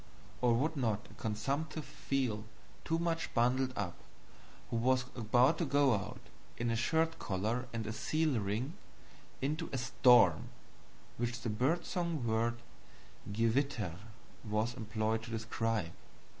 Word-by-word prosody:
Or 120 -2 +4
would 155 +7 +1
not 115 -5 -1
a - - -13
comsumptive 140 +8 -2
feel 125 -6 -2 0.4
too 165 - 0
much 165 0 -1
bundled 130 +2 +3
up, 95 -4 -2 0.8
who 115 - +1
was 130 +2 +2
about 120 +7 +3
to 170 - +1
go 140 -2 +4
out, 105 0 -3 0.4
in 120 0 0
a - - +1
shirt 160 +8 +1
collar 110 +6 -1
and 115 -2 -3
a 110 - -3
seal 155 +1 +1
ring, 110 +9 -2 0.7
into 155 +4 -1
a 135 - -1
storm 125 0 +5 0.7
which 120 0 -2
the 115 - -2
bird 140 +11 +1
song 170 -7 -1
word 115 +1 0 0.7
GEWITTER 115 - 0 0.4
was 110 +1 0
employed 110 -1 -1
to 115 - -9
describe? 115 -4 -1
120 Hz, 135 wpm, -34 LUFS, 110-140 Hz, 0.8 s, storm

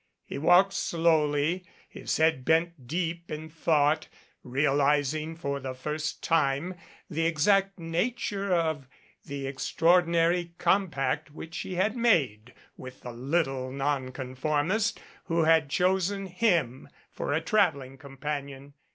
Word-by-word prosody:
He - - -6
walked 180 +5 +5
slowly, 165 0 +1 0.2
his - - -3
head 160 -5 +2
bent 160 -3 +1
deep 170 +2 -3
in 155 0 -6
thought, 155 -1 +2 0.4
realizing 145 +3 +1
for 140 -4 -3
the 130 -1 -5
first 150 +3 -4
time 155 +2 +1 0.3
the 165 -1 0
exact 195 +5 +2
nature 195 +4 -2
of 160 -6 0 0.4
the 140 -1 -5
extraordinary 170 +4 +2
compact 155 -6 0
which 160 +2 -8
he 185 - -5
had 210 +6 +1
made 135 - +1 0.2
with 130 0 -10
the 125 - -7
little 135 0 -1
nonconformist 140 - -1 0.3
who 165 0 +1
had 160 -2 +4
chosen 190 +4 +1
him 170 - 0 0.2
for - - -4
a 150 - +2
traveling 160 -8 0
companion. 140 0 -6
155 Hz, 115 wpm, -28 LUFS, 140-175 Hz, 0.4 s, walked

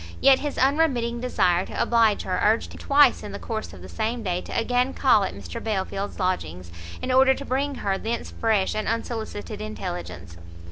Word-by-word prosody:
Yet 270 -1 +6
his 290 0 -4
unremitting 260 -4 +1
desire 180 -8 +2
to - - -6
oblige 225 -3 +3
her 185 -1 -2
urged 220 +2 +2
him - - -11
twice 280 -2 +4
in 205 - -8
the - - -4
course 220 +1 -5
of 90 -2 -12
the - - -9
same 225 - -3
day 180 -2 -1
to - - -5
again 245 +3 0
call 245 -7 +4
at - - -5
Mr 90 -4 -8
Belfield's 200 -1 -3
lodgings, 90 - -2 0.3
in 255 - -1
order 265 +1 +5
to 280 - -8
bring 275 +2 -1
her 195 -4 -2
thence 230 +2 -4
fresh 215 -4 +1
and 215 0 -3
unsolicited 220 -2 -4
intelligence. 85 - -6
220 Hz, 190 wpm, -24 LUFS, 185-250 Hz, 0.3 s, Yet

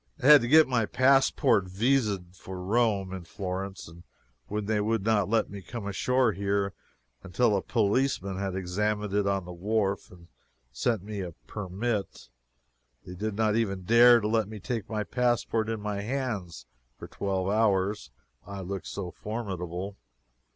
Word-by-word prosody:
I - - -5
had 150 -1 +9
to 120 - -2
get 155 +4 +7
my 120 -5 +1
passport 130 -6 +3
vised 100 -3 0
for 95 0 -8
Rome 100 -1 +1
in 95 -2 -6
Florence, 95 +1 -5
and 85 +1 -13 0.5
then 105 0 -2
they 105 0 +1
would 110 -1 0
not 105 -3 +2
let 115 -2 +1
me 100 -1 -7
come 115 +2 -7
ashore 125 +4 +1
here 100 0 -1 0.5
until 105 +3 +1
a 95 - 0
policeman 105 -4 0
had 95 -2 -2
examined 105 +2 -1
it 100 -1 +1
on 100 -2 0
the 90 - -8
wharf 100 +1 -1
and 85 -2 -16 0.4
sent 105 - -1
me 105 -1 -5
a 90 -3 -6
permit. 100 - -4 0.8
They 90 - -8
did 105 +3 -3
not 110 0 +1
even 100 -5 -1
dare 120 +4 +7
to 105 - -1
let 110 -1 +1
me 110 -1 -8
take 115 +1 -4
my 110 -1 -1
passport 120 -2 0
in 115 -1 -2
my 105 -1 -3
hands 105 - -4 0.3
for - - -9
twelve 95 -1 -2
hours, 105 -1 +1 0.3
I 100 -1 -7
looked 95 +1 -5
so 95 -3 -5
formidable. 95 -3 -5
105 Hz, 165 wpm, -28 LUFS, 95-115 Hz, 0.8 s, had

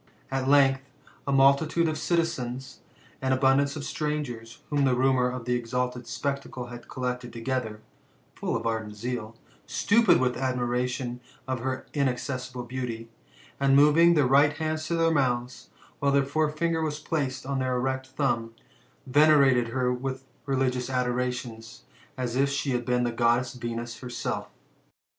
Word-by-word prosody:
At 135 -1 -1
length, 135 -1 +5 0.5
a - - +1
multitude 140 +5 +4
of 155 - 0
the - - -5
citizens, 135 -7 -2 0.4
and 130 0 +2
abundance 135 +2 +3
of 150 - -5
strangers, 150 -7 -4
whom 145 -1 +2
the 130 -2 +3
rumour 130 -1 +3
of 125 -2 -6
the 125 - 0
exalted 125 0 -2
spec 140 +3 -2
tacle 125 -2 -8
had 120 0 -10
collected 125 -3 -3
together, 115 -2 -3 0.5
full - - -3
of 115 0 -3
ardent 110 -2 -2
zeal, 115 0 -4 0.3
stupid 185 - +4
with 125 -2 +1
ad 130 0 -1
miration 125 0 -2 0.3
of 130 -1 -2
her 130 +2 -3
inaccessible 130 -2 -2
beauty, 120 -2 -5 0.5
and 135 0 +4
moving 155 +4 +6
their 145 -3 +4
right 140 +3 +5
hand 155 0 -2
to 155 +2 -2
their 165 0 +3
mouths, 125 -4 -1 0.3
while 140 0 +2
their 140 0 +3
forefinger 155 +3 0
was 155 -1 -1
placed 135 -5 -2
on 135 0 -1
their 130 -1 0
erect 130 +1 -1
thumb, 120 -4 -1 0.5
venerated 140 -3 +5
her 125 +1 0
with 130 +1 -4 0.2
religious 130 -2 0
adorations, 125 -2 -3 0.3
as 125 -2 -2
if 140 +2 +3
she 140 0 -1
had 120 -1 -1
been 125 0 +1
the 120 - 0
Goddess 120 +1 +1
Venus 120 -1 -5
herself. 125 -2 -4
130 Hz, 155 wpm, -27 LUFS, 125-140 Hz, 0.5 s, moving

